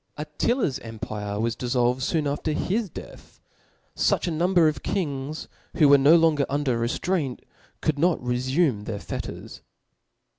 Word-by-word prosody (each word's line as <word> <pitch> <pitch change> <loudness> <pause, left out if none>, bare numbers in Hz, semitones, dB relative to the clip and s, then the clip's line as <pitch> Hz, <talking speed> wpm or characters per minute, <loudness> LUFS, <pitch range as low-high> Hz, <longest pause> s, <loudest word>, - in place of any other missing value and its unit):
Attila's 150 - -1
empire 110 -2 -5
was 115 +1 0
diflbl 125 0 +1
ved 130 +1 -7
foon 155 +2 0
after 145 +2 -1
his 205 +6 -1
death; - - -12 0.6
fuch - - +1
a 175 - -1
number 170 -1 +3
pf - - -11
kings, 145 -4 -3 0.3
who 150 - +6
were 140 0 +8
no 145 +5 +6
longer 160 -4 +3
under 140 -4 0
rcftrainr, 135 +3 -1 0.4
could 150 -2 0
not 175 +1 +2
refume 125 -1 0
their 105 -2 -4
fetters. - - -7
145 Hz, 145 wpm, -25 LUFS, 125-160 Hz, 0.6 s, were